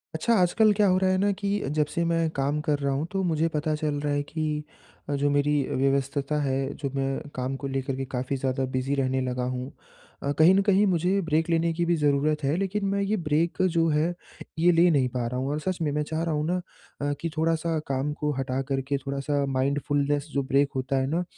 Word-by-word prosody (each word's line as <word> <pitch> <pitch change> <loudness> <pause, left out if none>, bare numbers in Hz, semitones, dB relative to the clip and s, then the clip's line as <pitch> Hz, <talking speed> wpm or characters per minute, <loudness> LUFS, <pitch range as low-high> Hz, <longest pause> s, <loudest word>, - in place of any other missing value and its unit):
अच्छा, 230 +9 +1
आजकल 205 +4 +4
क्या 205 0 +3
हो 185 - +4
रहा 190 0 +2
है 185 - +2
ना 200 +1 +2
कि 200 +1 -1 0.2
जब 150 - +3
से 170 - -1
मैं 165 -1 +1
काम 140 +2 0
कर 150 -2 0
रहा 140 -1 0
हूँ 140 +3 -1
तो 195 - -1
मुझे 165 -2 +1
पता 155 0 0
चल 150 -1 -2
रहा 145 -1 0
है 145 0 0
कि 155 -2 -1 0.5
अ, - - 0
जो 145 +1 +1
मेरी 145 +1 +2 0.2
व्यस्तता 140 +2 0
है, 135 0 -1
जो 140 - -4
मैं 135 +2 -2
काम 130 +1 -2
को 140 +1 -5
लेकर 135 0 -2
के 135 0 -3
काफ़ी 130 +1 -3
ज़्यादा 130 0 -1
बिज़ी 130 +2 0
रहने 130 -1 0
लगा 125 0 -2
हूँ। 125 +1 -3 0.5
अ, 140 - 0
कहीं 165 +4 +7
न 195 - +4
कहीं 200 0 +3
मुझे 185 +2 +2
ब्रेक 160 +2 +2
लेने 165 0 +2
की 170 +1 0
भी 175 - +2
ज़रूरत 150 0 +1
है, 140 +3 +1
लेकिन 195 +1 -1
मैं 200 0 0
ये 205 +2 0
ब्रेक 165 0 0
जो 170 -3 +2
है, 155 +3 +1 0.5
ये 175 +2 +5
ले 170 +1 +5
नहीं 135 -5 +3
पा 125 -1 -2
रहा 125 +1 -3
हूँ 135 +2 -2
और 150 - -1
सच 185 +3 -2
में 150 - 0
मैं 150 +1 0
चाह 160 +2 -3
रहा 165 -1 -1
हूँ 150 0 -1
ना 180 - +1 0.4
अ, 145 0 0
कि 165 - -1
थोड़ा-सा 165 0 +1
काम 135 +2 -1
को 150 0 -2
हटा 130 0 -1
कर 135 -1 0
के 140 - +3
थोड़ा-सा 140 +1 -2
माइंडफुलनेस 140 +2 0
जो 140 - +1
ब्रेक 140 +1 +2
होता 135 +1 -1
है 130 - 0
ना? 165 +5 0
150 Hz, 240 wpm, -26 LUFS, 135-165 Hz, 0.5 s, कहीं